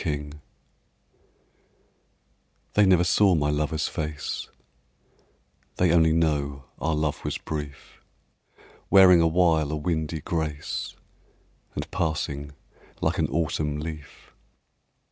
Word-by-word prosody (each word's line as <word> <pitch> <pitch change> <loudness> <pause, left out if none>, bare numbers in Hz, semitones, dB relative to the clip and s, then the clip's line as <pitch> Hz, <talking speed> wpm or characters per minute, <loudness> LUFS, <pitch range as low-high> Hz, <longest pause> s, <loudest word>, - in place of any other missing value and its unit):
PITY 75 -3 -3 2.4
THEY 105 -1 +4
never 90 -2 +5
saw 90 +2 +4
my 75 -1 +1
lover's 75 +1 -1
face, 75 0 -4 1.3
They 90 -2 +2
only 80 -1 +4
know 70 -4 0
our 80 0 0
love 75 -1 -2
was - - -2
brief, 75 -3 -7 0.9
Wearing 90 -3 +7
awhile 80 -2 +3
a - - -1
windy 80 0 -2
grace 80 -4 -3 0.8
And - - -5
passing 75 -2 -2 0.5
like - - 0
an - - +2
autumn 75 -3 -1
leaf. 75 -2 -9
80 Hz, 100 wpm, -25 LUFS, 75-85 Hz, 2.4 s, Wearing